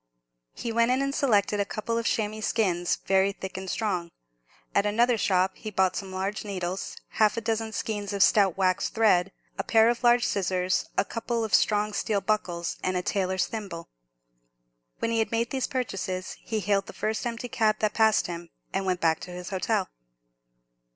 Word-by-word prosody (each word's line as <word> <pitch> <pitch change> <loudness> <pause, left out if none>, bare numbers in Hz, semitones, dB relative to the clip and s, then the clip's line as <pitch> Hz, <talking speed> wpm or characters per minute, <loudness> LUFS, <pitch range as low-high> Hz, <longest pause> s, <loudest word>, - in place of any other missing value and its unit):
He 235 - -4
went 230 +1 +3
in 255 +1 +2
and 275 0 -1
selected 210 -7 +2
a - - +3
couple 215 +3 -3
of 230 - -2
chamois 215 0 -1
skins, 185 -6 +1
very 195 +1 +3
thick 190 -1 -7
and 190 0 -5
strong. 185 -7 -1 0.6
At 200 +1 +3
another 235 +4 +3
shop 190 -3 +2
he 215 - -6
bought 190 -2 +1
some 195 -2 -5
large 190 +2 -3
needles, 185 -2 -4 0.2
half 215 +1 +4
a - - 0
dozen 225 0 -1
skeins 210 -1 -3
of 200 -1 +3
stout 195 -4 +4
waxed 185 -1 +1
thread, 195 -4 +4 0.3
a - - +1
pair 225 0 +5
of 240 +1 -1
large 240 0 +5
scissors, 185 -1 0
a - - +3
couple 230 0 -2
of 220 - -4
strong 210 0 +3
steel 205 -1 0
buckles, 180 -5 -1
and 185 0 0
a 180 - -2
tailor's 190 -2 0
thimble. 195 -7 -6 1.1
When 230 - -1
he 230 - +1
had 220 - 0
made 230 +1 0
these 265 -2 -1
purchases, 190 -7 -3
he 220 -2 -2
hailed 200 -1 +1
the - - -9
first 215 +1 -2
empty 235 +1 -4
cab 220 -3 +2
that 215 -1 0
passed 220 -1 +4
him, 170 -1 -6 0.2
and 195 0 -1
went 180 -1 0
back 160 -1 +3
to 180 - -8
his 180 0 -7
hotel. 190 -2 0
205 Hz, 190 wpm, -27 LUFS, 185-225 Hz, 1.1 s, pair